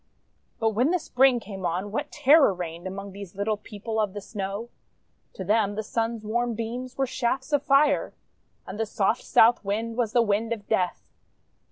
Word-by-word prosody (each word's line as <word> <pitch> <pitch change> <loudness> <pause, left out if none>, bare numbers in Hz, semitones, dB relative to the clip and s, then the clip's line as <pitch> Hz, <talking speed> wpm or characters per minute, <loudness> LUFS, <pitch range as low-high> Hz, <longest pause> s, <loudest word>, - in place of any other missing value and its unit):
• - - -46
•••••••*• - - -45 0.5
But 225 - +2
when 245 +7 +2
the 360 - +2
Spring 265 -5 +3
came 195 -4 -8
on, 185 +4 -2
what 220 - -3
terror 290 - +5
reigned 175 0 -6
Among 195 +1 -6
these 200 -1 -10
Little 205 +2 0
People 215 +2 -5
of 210 -3 0
the 205 - -5
Snow! 200 +2 -5 0.6
To 190 - -6
them 205 +1 +1
the 220 - -3
Swi's 225 +1 -2
warm 235 +2 -1
beams 245 +3 -5
were 270 - +2
shafts 260 +3 -2
of 290 - +4
Fire, 285 +1 +3 0.5
And 210 - -8
the 225 - 0
soft 210 +3 0
South 235 +1 +4
Wind 220 +3 -2
was 235 -4 0
the 240 - +5
wind 220 +2 0
of 205 -3 -9
death. 185 -5 0
220 Hz, 195 wpm, -26 LUFS, 200-240 Hz, 0.6 s, terror